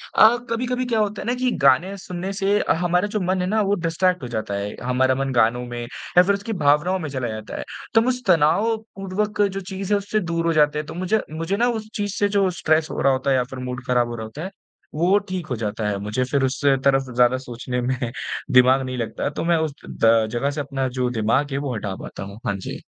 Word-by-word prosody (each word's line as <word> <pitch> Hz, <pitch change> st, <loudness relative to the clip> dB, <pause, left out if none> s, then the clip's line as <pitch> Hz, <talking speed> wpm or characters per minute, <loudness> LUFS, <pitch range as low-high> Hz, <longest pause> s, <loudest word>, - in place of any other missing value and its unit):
अ, 225 Hz, +3 st, +7 dB
कभी-कभी 250 Hz, +2 st, -1 dB
क्या 230 Hz, -3 st, 0 dB
होता 210 Hz, -1 st, -1 dB
है -, -, -7 dB
ना, 245 Hz, -, +2 dB
कि 250 Hz, 0 st, 0 dB
गाने 155 Hz, +8 st, +3 dB
सुनने 180 Hz, 0 st, -5 dB
से 200 Hz, +1 st, +1 dB
अ, -, -, +2 dB
हमारा 180 Hz, +3 st, +1 dB
जो 210 Hz, +1 st, -2 dB
मन 185 Hz, +1 st, 0 dB
है 180 Hz, -, -1 dB
ना, 215 Hz, +3 st, +2 dB
वो 200 Hz, 0 st, +2 dB
डिस्ट्रैक्ट 180 Hz, -1 st, 0 dB
हो -, -, -4 dB
जाता 110 Hz, -3 st, -3 dB
है। 100 Hz, +1 st, -4 dB
हमारा 130 Hz, +1 st, +2 dB
मन 135 Hz, 0 st, -1 dB
गानों 120 Hz, +1 st, +3 dB
में 120 Hz, 0 st, -6 dB
या 135 Hz, +8 st, +1 dB
फ़िर 200 Hz, -, +2 dB
उसकी 210 Hz, +3 st, -5 dB
भावनाओं 155 Hz, +6 st, +3 dB
में 155 Hz, -4 st, -4 dB
चला 130 Hz, -3 st, -3 dB
जाता 110 Hz, -1 st, -6 dB
है। -, -, -4 dB, 0.3 s
तो 225 Hz, -, +6 dB
हम 240 Hz, -, -1 dB
उस 250 Hz, -1 st, -1 dB
तनावपूर्वक 205 Hz, +4 st, +1 dB
जो 195 Hz, -1 st, +1 dB
चीज़ 190 Hz, +2 st, -3 dB
है -, -, +5 dB
उससे 205 Hz, +2 st, -1 dB
दूर 170 Hz, -3 st, -2 dB
हो 165 Hz, -, +2 dB
जाते 150 Hz, -1 st, +3 dB
हैं 155 Hz, -, -4 dB
तो 160 Hz, -, -7 dB
मुझे 185 Hz, +5 st, 0 dB
मुझे 165 Hz, +5 st, -2 dB
ना 240 Hz, +1 st, +3 dB
उस 220 Hz, -2 st, -3 dB
चीज़ 205 Hz, -1 st, -2 dB
से 205 Hz, 0 st, +2 dB
जो 200 Hz, -2 st, +2 dB
स्ट्रेस 155 Hz, 0 st, +2 dB
हो -, -, -3 dB
रहा 140 Hz, -, +4 dB
होता 130 Hz, +1 st, -1 dB
है -, -, +4 dB
या 125 Hz, -, +2 dB
फ़िर 130 Hz, +1 st, -9 dB
मूड 125 Hz, 0 st, -5 dB
ख़राब 125 Hz, -1 st, +2 dB
हो 120 Hz, -, -5 dB
रहा 110 Hz, -, -5 dB
होता 140 Hz, +9 st, -8 dB
है 190 Hz, -, -4 dB, 0.5 s
वो 180 Hz, +5 st, +4 dB
ठीक 180 Hz, -4 st, -4 dB
हो 125 Hz, -, -2 dB
जाता 110 Hz, -1 st, -3 dB
है। 100 Hz, -, -1 dB
मुझे 105 Hz, +5 st, -1 dB
फ़िर 135 Hz, +1 st, 0 dB
उससे 135 Hz, +1 st, +2 dB
तरफ़ 135 Hz, -1 st, +2 dB
ज़्यादा 125 Hz, +1 st, +4 dB
सोचने 125 Hz, 0 st, -4 dB
में 130 Hz, +1 st, -1 dB, 0.5 s
दिमाग 130 Hz, +1 st, +6 dB
नहीं 130 Hz, 0 st, -4 dB
लगता 115 Hz, +3 st, -2 dB
तो 145 Hz, -, -4 dB
मैं 170 Hz, 0 st, +3 dB
उस 160 Hz, -3 st, -1 dB, 0.2 s
द 115 Hz, -1 st, +3 dB
जगह 135 Hz, +4 st, 0 dB
से 145 Hz, 0 st, -3 dB
अपना 135 Hz, -2 st, -2 dB
जो 125 Hz, -1 st, +1 dB
दिमाग 125 Hz, +5 st, +1 dB
है 135 Hz, -, -1 dB
वो 140 Hz, -3 st, -2 dB
हटा 100 Hz, -3 st, -4 dB
पाता -, -, -7 dB
हूँ। 100 Hz, +2 st, -9 dB
हाँ, 100 Hz, -4 st, 0 dB
जी। 95 Hz, -, -7 dB
150 Hz, 255 wpm, -22 LUFS, 125-195 Hz, 0.5 s, अ